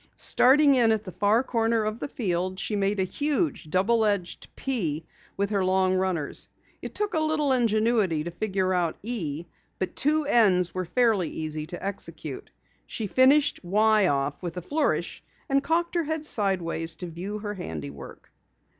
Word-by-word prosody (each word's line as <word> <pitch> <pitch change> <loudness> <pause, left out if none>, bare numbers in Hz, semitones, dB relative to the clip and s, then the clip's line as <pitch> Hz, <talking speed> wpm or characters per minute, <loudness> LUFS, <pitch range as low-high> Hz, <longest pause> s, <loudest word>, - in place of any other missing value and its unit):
Starting 280 +3 +5
in 240 -4 +4
at 220 -1 0
the 185 - -8
far 210 +6 +2
corner 230 -3 +1
of 215 +2 -3
the - - -4
field 185 -6 -2
she 210 - -2
made 200 0 0
a - - +3
huge 285 - -1
double 215 +7 +2
edged 200 -4 -1
"P" 165 - -2 0.3
with 200 +1 -1
her 200 -2 +1
long 185 0 +2
runners. 185 -5 -1 0.3
It - - -8
took 415 -2 -1
a 320 - +2
little 310 -3 +1
ingenuity 220 -8 +2
to 170 - -5
figure 190 0 -1
out 175 -3 0
an - - -34
"E" 170 -9 -3 0.3
but 185 - -3
two 305 +2 +2
"N's" 195 - +3
were 185 0 -3
fairly 220 -4 +2
easy 155 -1 -4
to 175 +3 -7
execute. 200 0 -6 0.4
She 225 - -4
finished 270 +7 +4
"Y" 210 +2 +3
off 140 -1 -1
with 175 -1 -5
a - - -2
flourish 300 - -1 0.2
and 275 -2 +2
cocked 340 +1 0
her 340 -2 0
head 315 0 -3
sideways 175 - 0
to 180 - -6
view 180 +5 -5
her 205 0 -5
handiwork. 75 - -8
205 Hz, 170 wpm, -26 LUFS, 180-245 Hz, 0.4 s, Starting